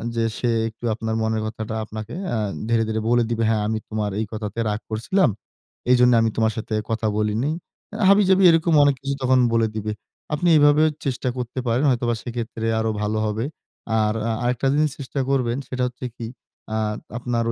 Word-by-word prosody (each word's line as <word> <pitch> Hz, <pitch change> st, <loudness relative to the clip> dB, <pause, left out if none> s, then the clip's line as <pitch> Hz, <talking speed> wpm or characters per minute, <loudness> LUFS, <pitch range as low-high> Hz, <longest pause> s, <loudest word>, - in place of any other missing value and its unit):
যে 115 Hz, -, +1 dB
সে 120 Hz, -, 0 dB, 0.2 s
একটু 115 Hz, +2 st, -10 dB
আপনার 110 Hz, 0 st, -3 dB
মনের 110 Hz, 0 st, 0 dB
কথাটা 110 Hz, 0 st, -5 dB
আপনাকে 110 Hz, +1 st, -7 dB, 0.2 s
আ -, -, +1 dB, 0.3 s
ধীরে, 115 Hz, -1 st, +3 dB
ধীরে 110 Hz, 0 st, -1 dB
বলে 120 Hz, 0 st, +4 dB
দিবে। 115 Hz, -1 st, 0 dB
"হ্যাঁ, 110 Hz, -2 st, +1 dB
আমি 110 Hz, 0 st, -1 dB
তোমার 105 Hz, -2 st, -2 dB
এই 110 Hz, -, 0 dB
কথাতে 105 Hz, 0 st, -4 dB
রাগ 105 Hz, 0 st, -1 dB
করছিলাম। 145 Hz, -, +2 dB, 0.6 s
এইজন্য 125 Hz, 0 st, +6 dB
আমি 115 Hz, -, +2 dB
তোমার 110 Hz, 0 st, +3 dB
সাথে 110 Hz, 0 st, -4 dB, 0.2 s
কথা 115 Hz, 0 st, 0 dB
বলিনি।" 110 Hz, +7 st, 0 dB, 0.4 s
আ -, -, -4 dB
হাবিজাবি 195 Hz, -1 st, +5 dB
এরকম 165 Hz, 0 st, +2 dB
অনেক 145 Hz, -1 st, +4 dB
কিছু 140 Hz, 0 st, -2 dB
তখন 130 Hz, 0 st, +4 dB
বলে 115 Hz, -1 st, +3 dB
দিবে। 110 Hz, 0 st, -2 dB, 0.4 s
আপনি 160 Hz, +4 st, 0 dB
এভাবে 145 Hz, +1 st, +5 dB, 0.2 s
চেষ্টা 130 Hz, -1 st, -1 dB
করতে 125 Hz, +1 st, -4 dB
পারেন 120 Hz, +4 st, +2 dB
হয়তোবা 120 Hz, -2 st, +1 dB
সেক্ষেত্রে 115 Hz, -2 st, -4 dB
আরো 110 Hz, 0 st, 0 dB
ভালো 105 Hz, +1 st, -1 dB
হবে। 110 Hz, +3 st, -2 dB, 0.6 s
আর 105 Hz, 0 st, +1 dB, 0.2 s
আ -, -, +1 dB
আরেকটা 125 Hz, +2 st, 0 dB
জিনিস 150 Hz, 0 st, +2 dB
চেষ্টা 140 Hz, +1 st, -4 dB
করবেন। 125 Hz, -3 st, +1 dB
সেটা 125 Hz, -1 st, -1 dB
হচ্ছে 125 Hz, +1 st, -6 dB
কি? 115 Hz, -, -5 dB, 0.5 s
আ -, -, +1 dB, 0.4 s
আপনার 120 Hz, -1 st, -1 dB
115 Hz, 185 wpm, -23 LUFS, 110-130 Hz, 0.6 s, এইজন্য